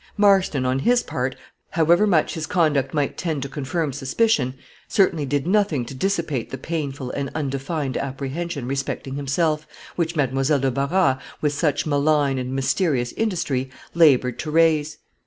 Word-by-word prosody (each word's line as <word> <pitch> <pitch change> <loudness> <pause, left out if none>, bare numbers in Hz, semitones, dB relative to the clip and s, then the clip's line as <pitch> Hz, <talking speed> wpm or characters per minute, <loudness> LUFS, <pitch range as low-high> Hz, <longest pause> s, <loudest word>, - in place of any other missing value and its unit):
Marston, 195 -10 +3
on 130 +1 +1
his 240 - +3
part, 125 +1 -3 0.3
however 170 +5 +3
much 165 -6 +2
his 160 -1 -4
conduct 145 -6 +1
might 145 -3 -1
tend 160 -6 -2
to - - -4
confirm 145 +2 -2
suspicion, 135 - +1 0.3
certainly 175 -8 +2
did 145 +1 0
nothing 185 - +1
to 125 - -8
dissipate 160 - -1
the 130 - -5
painful 140 -3 -4
and 140 -1 -3
undefined 140 -1 -2
apprehension 140 +1 -4
respecting 135 0 -3
himself, 150 +3 0 0.3
which 170 -1 -1
Mademoiselle 135 0 +1
de 135 -1 0
Barras, 140 +1 +1 0.2
with 150 -1 0
such 145 -1 0
malign 145 -2 +2
and 125 0 -4
mysterious 135 -2 0
industry, 155 - -1 0.2
labored 135 -7 +4
to 155 - -4
raise. 155 -1 +2
145 Hz, 150 wpm, -23 LUFS, 135-165 Hz, 0.3 s, labored